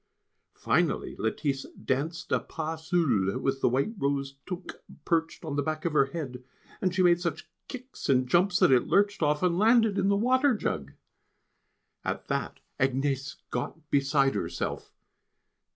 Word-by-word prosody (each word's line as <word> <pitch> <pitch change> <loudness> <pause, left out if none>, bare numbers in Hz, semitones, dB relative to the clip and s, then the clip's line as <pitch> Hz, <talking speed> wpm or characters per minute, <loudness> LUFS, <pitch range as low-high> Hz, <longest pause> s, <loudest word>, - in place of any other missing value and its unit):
Finally - - 0
Lettice 135 +5 -1
danced 160 +7 -3
a - - +3
pas 160 0 -6
seul 120 - +2
with 135 0 -1
the - - +4
white 135 - 0
rose 140 -1 -1
toque 180 0 -6 0.3
perched 165 0 0
on 150 -3 -3
the 145 - +1
back 155 +1 -3
of 170 - 0
her 140 - +5
head, 135 -5 -6 0.4
and 185 -1 0
she 185 - +3
made 175 -1 +4
such 170 -4 -3 0.2
kicks 255 +1 -8
and 130 -2 +3
jumps 180 +6 +3
that - - +5
it 125 -2 +4
lurched 200 -1 +2
off, 150 +1 +1
and 175 -1 +2
landed 225 -2 +4
in 195 - +2
the 200 - +3
water 255 +4 +3
jug! 70 - -3 1.1
At - - -3
that - - -2 0.2
Agnès 135 0 0 0.2
got 150 +5 -5
beside 135 -1 +3
herself. - - -4
155 Hz, 155 wpm, -28 LUFS, 135-180 Hz, 1.1 s, her